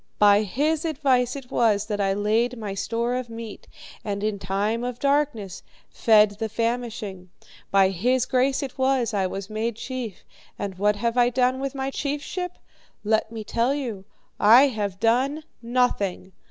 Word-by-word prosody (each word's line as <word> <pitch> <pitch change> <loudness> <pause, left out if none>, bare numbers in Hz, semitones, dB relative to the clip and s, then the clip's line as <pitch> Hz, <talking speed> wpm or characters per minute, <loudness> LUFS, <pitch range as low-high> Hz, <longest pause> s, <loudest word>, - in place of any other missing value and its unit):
By 205 0 +6
his 295 +10 0
advice 265 -6 +1
it 270 -3 -9
was 215 -3 +2
that 210 -1 -2
I 195 -1 +2
laid 220 +5 +1
my 210 -3 -5
store 230 +4 -2
of 250 -1 -3
meat, 225 -2 -8 0.4
and 200 -1 -3
in 210 -2 -1
time 205 +5 -1
of 245 -1 -3
darkness 275 -9 0 0.3
fed 210 -2 +4
the 225 -1 -2
famishing. 230 -5 -3 0.4
By 195 -1 +4
his 245 +7 +1
grace 260 +2 +1
it 265 0 -7
was 260 -2 +2
that 210 - -2
I 190 - +1
was 195 +1 -6
made 220 +2 -2
chief. 245 -4 -6 0.3
And 200 -1 -4
what 210 +1 +3
have 235 +3 -1
I 245 0 +5
done 250 +1 +1
with 275 0 -4
my 270 0 -2
chiefship? 295 +6 -3 0.5
Let 220 +1 +1
me 225 -1 -6
tell 235 +5 0
you. 235 -9 -4 0.4
I 240 +7 +7
have 205 -5 -3
done 260 +7 +1 0.2
nothing. 230 -6 0
230 Hz, 165 wpm, -24 LUFS, 205-255 Hz, 0.5 s, I